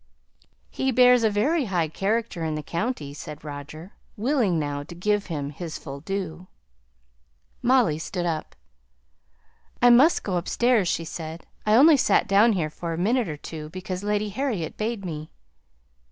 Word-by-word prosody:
"He 265 0 0
bears 250 0 +6
a 220 - +4
very 275 +9 +1
high 175 -6 0
character 195 +2 -2
in 155 -1 -1
the 150 - -4
county," 170 - -3
said 150 0 -9
Roger, 150 +4 -8 0.2
willing 225 - +1
now 145 -2 -2
to 160 +4 -10
give 205 +3 0
him 145 -4 -4
his 160 +2 -6
full 140 -2 -8
due. 180 0 -5 1.1
Molly 245 - +3
stood 175 +2 -3
up. 160 -2 -3 1.2
"I 245 0 +6
must 270 +8 +5
go 185 -3 -1
upstairs," 225 +3 +2
she 165 - -1
said; 160 0 -7 0.2
"I 210 - +5
only 295 +5 +7
sate - - +3
down 210 +3 +5
here 160 -6 -1
for 165 +1 -5
a - - -4
minute 220 +3 +1
or 150 - -5
two 155 0 -8
because 185 +1 -5
Lady 210 0 0
Harriet 210 - -3
bade 215 -2 -3
me." 155 -2 -6
185 Hz, 160 wpm, -25 LUFS, 160-230 Hz, 1.2 s, only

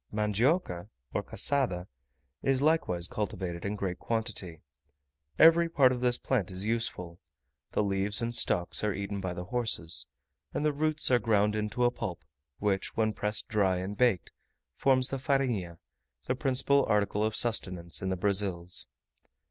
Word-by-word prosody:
Mandioca 105 - 0 0.2
or - - 0
cassada 125 -11 +1 0.6
is 135 -1 +2
likewise 135 - +1
cultivated 90 -5 -4
in 100 +1 -2
great 95 -3 -3
quantity. 110 -8 -2 0.7
Every 165 +1 +6
part 135 -6 +4
of 125 -1 -3
this 125 -1 +2
plant 110 -9 -1
is 95 +1 -2
useful; 90 -7 -2 0.5
the - - +2
leaves 100 +1 +2
and 120 0 -1
stalks 90 -5 +1
are 105 -2 0
eaten 100 0 -4
by 90 -2 -3
the 90 - -5
horses, 110 -7 -1 0.5
and 150 - 0
the 150 - +2
roots 155 -1 0
are 125 - +5
ground 105 -1 +2
into 105 +3 0
a 120 - +3
pulp, 90 -7 -5 0.3
which, 100 -2 -1
when 110 -1 +2
pressed 105 +1 -1
dry 100 -4 +1
and 95 +3 -4
baked, 120 -6 +1 0.4
forms 130 -2 +3
the 135 - -2
farinha, 125 - -1 0.5
the 125 - 0
principal 135 +2 +2
article 105 -1 +1
of 110 0 0
sustenance 90 -7 -1
in 95 - -2
the 95 - -1
Brazils. 95 -2 -1
105 Hz, 155 wpm, -29 LUFS, 95-125 Hz, 0.7 s, Every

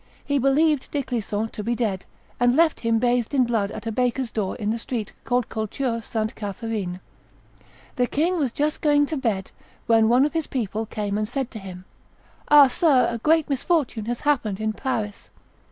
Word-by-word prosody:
He 285 -1 +1
believed 280 +2 +2
De 285 -2 -1
Clisson 225 -3 -2
to 210 - -7
be 235 +2 0
dead, 210 -6 -2 0.3
and 245 +1 +3
left 325 0 +3
him 230 -1 +1
bathed 245 +2 +1
in 260 - +5
blood 225 -4 0
at 215 +2 -8
a 225 - -2
baker's 250 +1 0
door 200 -4 -2
in 210 -3 -2
the 230 - -2
street 225 -3 -4
called 245 -2 +1
Culture 230 +2 -2
Sainte 220 0 -3
Catherine. 205 -3 -4 1.0
The 250 -1 +2
king 335 +7 0
was 270 -5 0
just 295 +4 -1
going 290 -1 +4
to 310 - -4
bed, 215 -8 -2 0.3
when 225 -1 +4
one 250 +4 +5
of 300 - -2
his 325 -2 -1
people 220 -3 -3
came 205 -2 -2
and 215 0 -2
said 265 -1 -3
to 220 - -7
him, 185 -2 -9 0.6
"Ah! 295 -1 +9
sir, 270 0 +3
a 235 - -4
great 315 +5 +3
misfortune 275 -5 0
has 240 +1 -3
happened 235 -9 0
in 215 0 -1
Paris." 215 -3 -4
235 Hz, 190 wpm, -24 LUFS, 215-275 Hz, 1.0 s, Ah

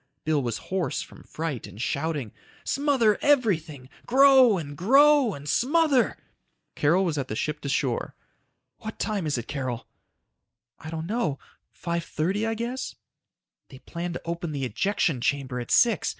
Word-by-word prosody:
Bill 155 -2 +1
was 120 -4 -2 0.2
hoarse 190 -3 -1
from - - -15
fright 155 -7 -5
and 100 - -13
shouting. 140 -1 -2 0.3
"Smother 270 -7 +2
everything, 170 - +1 0.2
grow 260 -4 +6
and 145 -4 -6
grow 275 - +5
and 140 +1 -10
smother 280 - +2 0.3
..." - - -50
Carol 175 +6 +3
was 155 -4 -1
at 135 - -3
the 110 - -4
ship 150 +5 -3
to 140 - -4
shore. 135 -3 -1 0.6
"What 220 - -7
time 200 -7 -2
is 145 - 0
it, 120 - -5
Carol?" 130 -5 -4 0.9
"I 160 - -8
don't 160 0 -4
know. 185 - -1 0.4
5:30 170 +4 -1
I 225 - -1
guess." 240 +4 -4 0.7
"They 130 - -12
plan 170 +5 -6
to - - -6
open 170 -1 -4
the 140 -2 -2
ejection 165 -2 0
chamber 135 -2 -1
at 120 - -6
six. 230 -6 +3
170 Hz, 155 wpm, -26 LUFS, 140-225 Hz, 0.9 s, grow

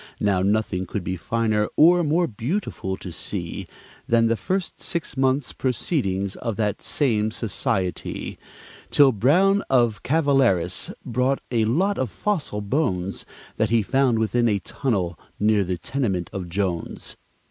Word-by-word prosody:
Now, 100 -3 +2
nothing 100 -2 0
could 100 +2 -3
be 90 +1 -2
finer 110 +2 0
or 175 +3 +6
more 165 +3 +2
beautiful 120 - -3
to 90 - -8
see 85 0 -5 0.4
Than 115 -1 +4
the 115 0 +3
first 185 - -3
six 170 -6 -4
months' 130 0 +1
proceedings 100 - -1
of 115 -3 -3
that 105 -2 -1
same 110 -7 +1
society, 95 -4 -3 0.5
Till 140 -2 +6
Brown 180 - +4
of 120 -5 +3
Calaveras 130 - +2
brought 125 +3 +1
a 115 -3 +2
lot 185 - +1
of 130 - 0
fossil 155 - -2
bones 100 - -1 0.3
That 110 - +1
he 115 -1 +3
found 130 +2 +2
within 115 +2 +2
a 105 - +2
tunnel 95 - -2 0.2
near 105 -1 +3
the 90 -1 -2
tenement 100 - -2
of 90 -3 -5
Jones. 90 -2 -3
115 Hz, 140 wpm, -24 LUFS, 100-135 Hz, 0.5 s, or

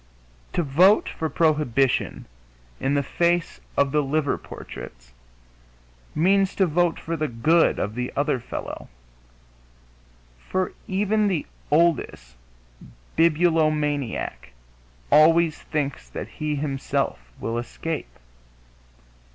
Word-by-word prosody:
To 175 - +1
vote 175 +9 +4
for 160 - -3
prohibition 145 -5 +1 0.5
in 140 +2 0
the 140 - +2
face 170 +3 0 0.2
of 140 -1 +3
the 150 +1 +3
liver 145 0 0
portraits 60 -1 -10 1.0
means 195 +4 +3
to 190 - +3
vote 175 0 +1
for 165 - -3
the 155 -1 -1
good 155 +8 +3
of 105 - -2
the 125 +1 -3
other 140 -2 +1
fellow, 120 - -7 1.5
for 185 - -2
even 205 +2 +1
the 180 -6 -1 0.2
oldest 140 - +1 0.8
bibulomaniac 155 - +1 0.6
always 165 +1 +5
thinks 140 - -3
that - - -6
he 150 -1 -3
himself 140 - -1 0.2
will 115 +1 -2
escape. 155 +6 -5
155 Hz, 100 wpm, -24 LUFS, 135-170 Hz, 1.5 s, always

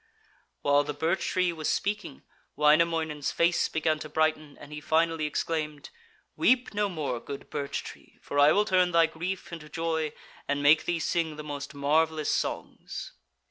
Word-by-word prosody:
While 145 0 +4
the 150 0 -5
birch 160 +5 0
tree 180 -2 +1
was 155 -2 -3
speaking, 205 -8 -2 0.3
Wainamoinen's 155 0 +2
face 170 +1 +2
began 155 -1 0
to 155 - -7
brighten, 155 -1 0
and 145 +1 -11
he 150 - -6
finally 160 0 +1
exclaimed: 150 -1 -3 0.4
'Weep 255 -2 +2
no 205 0 +1
more, 145 -9 -3
good 140 +4 -9
birch 140 -1 -3
tree, - - -12
for 145 - -3
I 145 +1 +7
will 210 +1 +3
turn 180 -3 +2
thy 165 0 +6
grief 170 +3 -5
into 150 -2 -8
joy 160 -1 -1 0.4
and 145 0 -1
make 150 +2 +5
thee 175 - 0
sing 165 -1 -1
the 150 - -7
most 145 -1 -6
marvellous 155 +2 +1
songs.' - - -4
155 Hz, 165 wpm, -28 LUFS, 150-170 Hz, 0.4 s, I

